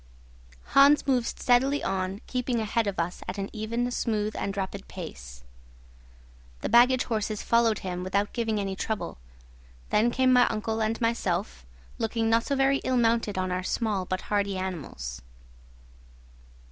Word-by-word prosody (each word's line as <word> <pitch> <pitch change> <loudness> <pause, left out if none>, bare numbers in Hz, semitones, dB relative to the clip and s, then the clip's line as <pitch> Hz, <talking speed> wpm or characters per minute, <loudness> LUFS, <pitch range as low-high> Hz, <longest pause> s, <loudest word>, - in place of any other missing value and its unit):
Hans 280 +2 +6
moved 255 -4 +2
steadily 265 +3 +2
on, 190 +1 -2
keeping 250 -1 -1
ahead 220 0 0
of 200 - -2
us 170 +1 -2
at 185 - -4
an 195 0 -4
even, 230 +3 -2
smooth, 215 -3 -1
and 200 0 -3
rapid 195 0 -4
pace. 65 - -9 1.2
The - - -2
baggage 245 +3 +5
horses 215 -2 -2
followed 230 -2 +3
him 180 -1 -3
without 200 +2 -1
giving 225 -3 -1
any 195 -1 -2
trouble. 215 - -4 0.7
Then 225 +3 +4
came 255 +1 +3
my 250 0 +6
uncle 220 0 -2
and 220 +1 0
myself, 175 - -1 0.3
looking 225 0 0
not 230 +1 +3
so 280 - 0
very 270 0 +3
ill 255 - 0
mounted 230 -4 +1
on 185 0 -1
our 180 0 -1
small 200 -1 -1
but 185 +1 -3
hardy 200 -2 -1
animals. 140 - -5
215 Hz, 150 wpm, -27 LUFS, 190-235 Hz, 1.2 s, Hans